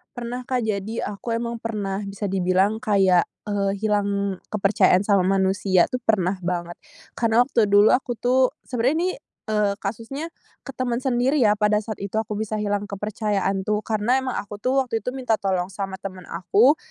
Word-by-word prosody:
Pernah, 245 Hz, +1 st, -5 dB
Kak, 250 Hz, 0 st, 0 dB
jadi 215 Hz, 0 st, -2 dB
aku 210 Hz, +3 st, -5 dB
emang 235 Hz, 0 st, -2 dB
pernah 210 Hz, -4 st, -3 dB
bisa 200 Hz, +1 st, -4 dB
dibilang 190 Hz, +3 st, +2 dB
kayak, 195 Hz, -6 st, +3 dB, 0.2 s
eee, 200 Hz, -1 st, 0 dB
hilang 200 Hz, -2 st, 0 dB, 0.2 s
kepercayaan 195 Hz, -2 st, +3 dB
sama 200 Hz, -3 st, +2 dB
manusia 190 Hz, -1 st, +2 dB
tuh 250 Hz, -, -1 dB
pernah 195 Hz, -3 st, +2 dB
banget. 175 Hz, -1 st, -4 dB, 0.4 s
Karena 230 Hz, 0 st, +3 dB
waktu 245 Hz, -3 st, +2 dB
dulu 205 Hz, +1 st, +5 dB
aku 250 Hz, -1 st, +2 dB
tuh 255 Hz, +2 st, +2 dB
sebenernya 270 Hz, +9 st, 0 dB
ini, -, -, 0 dB, 0.4 s
eee, 210 Hz, -2 st, +2 dB
kasusnya 230 Hz, +10 st, -5 dB, 0.3 s
ke -, -, -13 dB
temen 245 Hz, -1 st, -1 dB
sendiri 260 Hz, +2 st, +1 dB
ya, 210 Hz, -2 st, +4 dB
pada 210 Hz, 0 st, +2 dB
saat 215 Hz, -1 st, -6 dB
itu 200 Hz, -1 st, -6 dB
aku 210 Hz, -1 st, -5 dB
bisa 215 Hz, 0 st, -2 dB
hilang 205 Hz, 0 st, -1 dB
kepercayaan 200 Hz, -1 st, -2 dB
tuh, 210 Hz, +1 st, 0 dB
karena 220 Hz, +5 st, +1 dB
emang 260 Hz, -1 st, -3 dB
aku 205 Hz, +1 st, -6 dB
tuh 265 Hz, +2 st, +2 dB
waktu 225 Hz, -3 st, -2 dB
itu 250 Hz, -, -3 dB
minta 250 Hz, -3 st, 0 dB
tolong 190 Hz, -3 st, -1 dB
sama 195 Hz, -1 st, -4 dB
temen 185 Hz, -1 st, -9 dB
aku, 215 Hz, -, +3 dB
210 Hz, 175 wpm, -23 LUFS, 195-235 Hz, 0.4 s, dulu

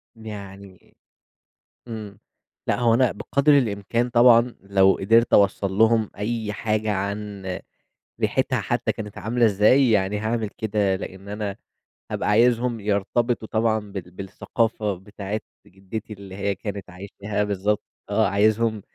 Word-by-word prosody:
يعني 100 Hz, -4 st, -10 dB, 0.9 s
إمم، 105 Hz, -3 st, -7 dB, 0.5 s
لأ -, -, +1 dB
هو 120 Hz, -2 st, +4 dB
أنا 125 Hz, 0 st, +3 dB
بقدر 140 Hz, +7 st, +3 dB
الإمكان 115 Hz, 0 st, 0 dB
طبعًا، 120 Hz, 0 st, +5 dB
لو 95 Hz, 0 st, +4 dB
قدرت 115 Hz, +4 st, +3 dB
أوصل 100 Hz, -1 st, +3 dB
لهُم 110 Hz, +1 st, +3 dB
أي 110 Hz, 0 st, -2 dB
حاجة 110 Hz, 0 st, -1 dB
عن 100 Hz, 0 st, -4 dB, 0.8 s
ريحتها -, -, +1 dB
حتى -, -, -1 dB
كانت 105 Hz, -2 st, -8 dB
عاملة 120 Hz, +2 st, +2 dB
إزاي، 110 Hz, +6 st, +4 dB
يعني 105 Hz, -1 st, +2 dB
هاعمل 110 Hz, 0 st, -1 dB
كده، 100 Hz, -3 st, +1 dB
لإن 95 Hz, +1 st, -9 dB
أنا 105 Hz, -1 st, -4 dB, 0.6 s
هابقى -, -, -1 dB
عايزهم 120 Hz, +2 st, +3 dB
يرتبطوا 110 Hz, +3 st, 0 dB
طبعًا 110 Hz, 0 st, +2 dB
بال 90 Hz, -3 st, -7 dB
بالثقافة 105 Hz, +3 st, -2 dB
بتاعة 100 Hz, +2 st, -6 dB, 0.3 s
جدّتي، 100 Hz, +3 st, -7 dB
اللي 100 Hz, -2 st, -10 dB
هي 100 Hz, 0 st, -1 dB
كانت 100 Hz, -3 st, -6 dB
عايشاها 100 Hz, +3 st, -4 dB
بالضبط، 105 Hz, +1 st, -1 dB, 0.3 s
آه -, -, +2 dB
عايزهم 110 Hz, +1 st, +2 dB
105 Hz, 125 wpm, -23 LUFS, 100-115 Hz, 0.9 s, طبعًا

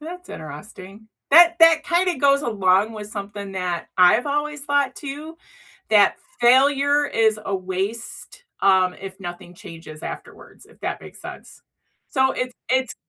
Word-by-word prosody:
that's 360 Hz, +3 st, -9 dB
interesting, 185 Hz, +7 st, -11 dB, 0.2 s
that 340 Hz, +2 st, +7 dB
that 330 Hz, -1 st, +6 dB
kinda 355 Hz, 0 st, +1 dB
goes 280 Hz, +1 st, +3 dB
along 200 Hz, -2 st, +1 dB
with 210 Hz, -1 st, -8 dB
something 200 Hz, -1 st, -7 dB
that 180 Hz, -2 st, -4 dB
I've 190 Hz, +9 st, +5 dB
always 295 Hz, 0 st, -2 dB
thought 285 Hz, -1 st, 0 dB
too, 305 Hz, +3 st, -8 dB, 0.5 s
that 210 Hz, -2 st, +4 dB, 0.2 s
failure 280 Hz, +4 st, +4 dB
is 220 Hz, -3 st, +1 dB
a 195 Hz, -, -2 dB
waste, 195 Hz, -, -5 dB, 0.2 s
um, 185 Hz, -2 st, +3 dB
if 195 Hz, 0 st, -10 dB
nothing 175 Hz, 0 st, -9 dB
changes 165 Hz, -5 st, -12 dB
afterwards, -, -, -10 dB
if -, -, -23 dB
that -, -, -4 dB
makes -, -, -13 dB
sense, -, -, -11 dB, 0.5 s
so 265 Hz, -1 st, +1 dB
it's 250 Hz, 0 st, -4 dB
it's 260 Hz, -1 st, 0 dB
225 Hz, 140 wpm, -22 LUFS, 190-285 Hz, 0.5 s, that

